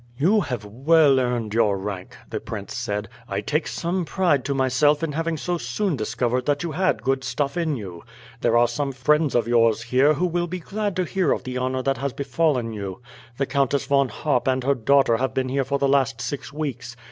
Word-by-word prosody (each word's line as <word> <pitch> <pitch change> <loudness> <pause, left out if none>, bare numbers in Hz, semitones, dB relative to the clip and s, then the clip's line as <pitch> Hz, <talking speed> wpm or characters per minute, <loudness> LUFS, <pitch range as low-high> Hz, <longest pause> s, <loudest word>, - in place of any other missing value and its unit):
"You 190 - +3
have 125 - -4
well 140 +5 +4
earned 120 -4 -1
your 105 -3 +2
rank," 95 -1 -6
the - - -4
prince - - -7
said. 105 0 -3 0.2
"I - - -2
take - - -1
some 175 +2 -2
pride 170 -6 +1
to 140 0 -1
myself 135 +4 +2
in 160 - -1
having 165 +2 -2
so 175 +3 -2
soon 160 - -1
discovered 125 +2 -1
that 145 +2 +1
you 170 - -3
had 170 - 0
good 135 +1 0
stuff 140 0 -2
in 165 -4 0
you. 95 -8 -8 0.4
There 120 0 +2
are 120 0 +5
some 135 +4 -2
friends 150 +3 +2
of 115 -2 +2
yours 115 -1 +3
here 130 +6 +3
who 180 - 0
will 175 0 -1
be 185 +2 -4
glad 205 +2 -3
to 185 - +1
hear 185 -5 0
of - - 0
the 130 0 -4
honour 130 0 -1
that 135 0 0
has 140 -1 -2
befallen 140 -5 0
you. 100 -3 -6 0.4
The 135 - +1
Countess 140 +1 0
Von 140 -1 +2
Harp 140 -6 -1
and 130 -1 +1
her 140 +2 +3
daughter 135 -1 +3
have 130 0 -2
been 130 -1 0
here 135 +1 +1
for 140 +2 -1
the 140 0 +1
last 135 -1 +2
six 145 -2 -5
weeks. 130 -5 -5
135 Hz, 215 wpm, -23 LUFS, 120-150 Hz, 0.4 s, are